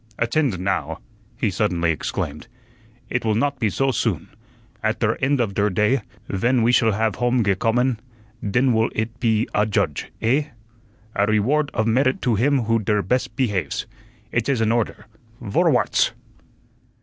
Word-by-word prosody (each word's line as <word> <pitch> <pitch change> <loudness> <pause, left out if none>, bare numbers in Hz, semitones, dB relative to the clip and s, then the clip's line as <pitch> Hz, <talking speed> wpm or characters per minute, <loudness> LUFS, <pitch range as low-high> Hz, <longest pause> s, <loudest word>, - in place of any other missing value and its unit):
"Attend 120 -2 +1
now," 80 -5 -1 0.4
he 115 -6 0
suddenly 90 -4 +1
exclaimed. 75 +1 -4 0.6
"It 120 - 0
will 110 -1 +1
not 140 +4 0
be 110 -4 +1
soh 135 +6 +1
soon. 120 - -1 0.5
At - - 0
der - - +2
end 140 +1 +2
of 110 -5 0
der 100 +1 +1
day, 105 +7 +2 0.3
ven 120 +5 +1
we 120 - +4
shall 115 -3 +3
have 110 0 0
home 120 0 +2
gecommen, 115 +5 +1 0.4
den 125 +5 +2
wull 110 +1 +2
it 110 +2 -3
pe 115 -3 +2
adjudge, 100 -7 0
eh? 135 +6 +2 0.7
A 100 +1 +2
REward 130 +8 +2
of 110 - +1
merit 130 +4 +2
to 120 - +2
him 130 +4 +2
who 115 +1 +1
der 105 -1 0
bes' 125 +1 0
pehaves. 105 - -2 0.5
It 120 +2 0
is 135 -4 +1
an 110 0 +2
order. 115 -1 -1 0.3
Vorwarts!" 105 -5 +2
115 Hz, 155 wpm, -22 LUFS, 105-125 Hz, 0.7 s, we